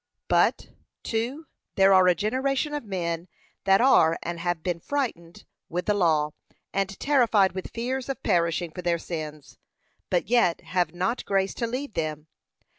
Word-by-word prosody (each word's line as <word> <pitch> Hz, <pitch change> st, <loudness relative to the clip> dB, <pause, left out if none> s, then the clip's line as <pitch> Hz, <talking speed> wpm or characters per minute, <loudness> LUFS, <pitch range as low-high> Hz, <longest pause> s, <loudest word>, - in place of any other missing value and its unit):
But, -, -, +2 dB, 0.3 s
2. 245 Hz, +8 st, -2 dB, 0.3 s
There 195 Hz, 0 st, +5 dB
are 185 Hz, -1 st, +6 dB
a 180 Hz, -, +5 dB
generation 265 Hz, -, -1 dB
of 295 Hz, -, -3 dB
men 175 Hz, -4 st, -3 dB, 0.4 s
that 195 Hz, +1 st, +5 dB
are 165 Hz, -11 st, +5 dB
and 170 Hz, 0 st, -4 dB
have 175 Hz, -1 st, -2 dB
been 175 Hz, -2 st, -1 dB
frightened 175 Hz, -, -4 dB, 0.2 s
with 180 Hz, +2 st, -3 dB
the 210 Hz, -, +2 dB
law, 160 Hz, -6 st, +2 dB, 0.4 s
and 195 Hz, -1 st, -2 dB
terrified 235 Hz, -9 st, +3 dB
with 190 Hz, 0 st, -6 dB
fears 255 Hz, +3 st, -3 dB
of 270 Hz, -, -4 dB
perishing 170 Hz, 0 st, +1 dB
for 180 Hz, -, -7 dB
their 175 Hz, -1 st, +1 dB
sins, 155 Hz, -3 st, -7 dB, 0.5 s
but -, -, 0 dB
yet 235 Hz, -9 st, +3 dB
have 175 Hz, -2 st, -1 dB
not 185 Hz, +8 st, -1 dB
grace 195 Hz, -1 st, +1 dB
to 235 Hz, -, -2 dB
leave 255 Hz, +1 st, -4 dB
them. 155 Hz, -3 st, -3 dB
190 Hz, 160 wpm, -26 LUFS, 170-235 Hz, 0.5 s, are